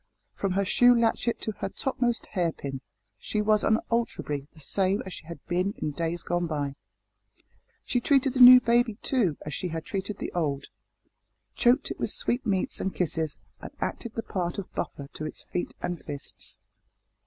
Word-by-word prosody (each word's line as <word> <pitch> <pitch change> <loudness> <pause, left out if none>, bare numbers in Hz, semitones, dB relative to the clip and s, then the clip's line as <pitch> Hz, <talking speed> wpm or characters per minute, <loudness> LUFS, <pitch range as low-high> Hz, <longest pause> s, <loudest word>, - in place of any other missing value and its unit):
From 195 -2 -1
her 200 +1 +1
shoe 245 +5 +6
latchet 235 +1 +1
to 220 - -1
her - - -2
topmost 245 0 -1
hair 175 -4 0
pin 135 -3 -6 0.4
she 210 - -2
was 215 0 +3
unalterably 220 -11 0
the 160 - -18
same 190 +6 0
as 190 - -7
she 155 - -10
had 170 - -7
been 185 +3 0
in 150 - -2
days 165 +2 -2
gone 175 0 0
by. 145 -3 -2 1.1
She 245 - +1
treated 270 0 +3
the 260 - -2
new 250 0 +12
baby, 235 -2 +2
too, 210 - +1
as 150 - -5
she 180 - -2
had 165 -1 -4
treated 195 0 -3
the - - -4
old 145 -5 -1 0.8
choked 250 +3 +3
it - - -6
with - - -1
sweetmeats 215 -6 0
and 190 - -2
kisses, 160 -3 -1 0.2
and - - -7
acted 235 -2 -4
the 225 - -2
part 175 -5 -2
of 200 - -6
buffer 140 - -4
to 155 - -5
its - - -7
feet 180 - -4
and 175 -1 -3
fists. 145 -2 -6
190 Hz, 175 wpm, -27 LUFS, 165-235 Hz, 1.1 s, new